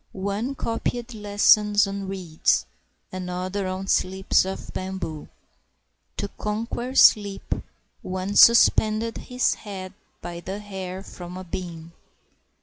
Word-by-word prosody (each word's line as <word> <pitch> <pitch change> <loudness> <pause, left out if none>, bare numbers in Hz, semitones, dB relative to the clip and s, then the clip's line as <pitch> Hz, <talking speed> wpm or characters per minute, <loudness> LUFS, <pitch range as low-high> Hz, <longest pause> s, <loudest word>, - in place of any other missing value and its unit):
One 200 +7 -3
copied 235 0 -3
lessons 210 0 +4
on 195 0 -5
reeds, 180 -5 0 0.5
another 185 +1 -3
on 185 +1 -4
slips 190 0 +2
of 190 0 -6
bamboo; 185 -5 -5 0.9
To - - -2
conquer 230 +4 -3
sleep 205 -5 +5 0.5
one 185 +2 -4
suspended 225 -1 +5
his 250 0 0
head 190 -2 -8 0.3
by 175 0 -7
the 190 +3 -5
hair 190 -2 -6
from 180 -2 -9
a 185 - -6
beam. 170 -2 -7
195 Hz, 110 wpm, -24 LUFS, 185-210 Hz, 0.9 s, sleep